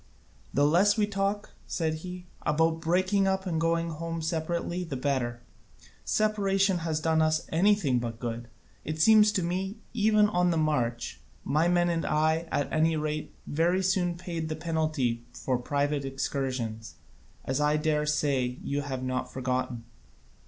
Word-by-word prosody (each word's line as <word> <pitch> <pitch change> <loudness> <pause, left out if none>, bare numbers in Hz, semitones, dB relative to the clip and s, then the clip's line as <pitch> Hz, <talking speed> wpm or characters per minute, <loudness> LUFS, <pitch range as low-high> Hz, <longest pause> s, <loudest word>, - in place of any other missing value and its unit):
"The 145 - +3
less 185 +8 +4
we 210 - +3
talk," 200 0 -2 0.2
said 160 -3 -1
he, 180 0 -7 0.2
"about 160 +2 +1
breaking 185 +4 +2
up 190 0 0
and 165 -3 -1
going 165 0 +1
home 165 +1 -4
separately 170 +2 -2
the 165 -6 -5
better; 125 -3 -1 0.6
separation 195 -3 +1
has 160 -2 -1
done 160 0 +2
us 155 0 +1
anything 170 -7 +3
but 115 -1 -5
good, 120 0 -4 0.4
it 155 +1 -4
seems 215 +4 +6
to 185 - 0
me, 190 +4 -2 0.2
even 215 -2 +4
on 180 -3 +2
the 170 - +1
march. 125 -7 -1 0.2
My 155 +4 +2
men 175 0 +3
and 170 -1 0
I, 160 +2 +1
at 145 - -1
any 160 +1 +3
rate, 150 0 -3
very 175 +5 +1
soon 180 -2 +1
paid 170 -3 -4
the 155 - -2
penalty 155 -7 -1
for 130 -1 -1
private 145 +2 -1
excursions; 130 -5 -3 0.5
as 130 +2 -1
I 150 +1 +3
dare 150 -1 0
say 140 -4 0
you 140 +1 -1
have 135 -2 -4
not 130 0 -2
forgotten." 130 -2 -2
160 Hz, 155 wpm, -28 LUFS, 140-180 Hz, 0.6 s, seems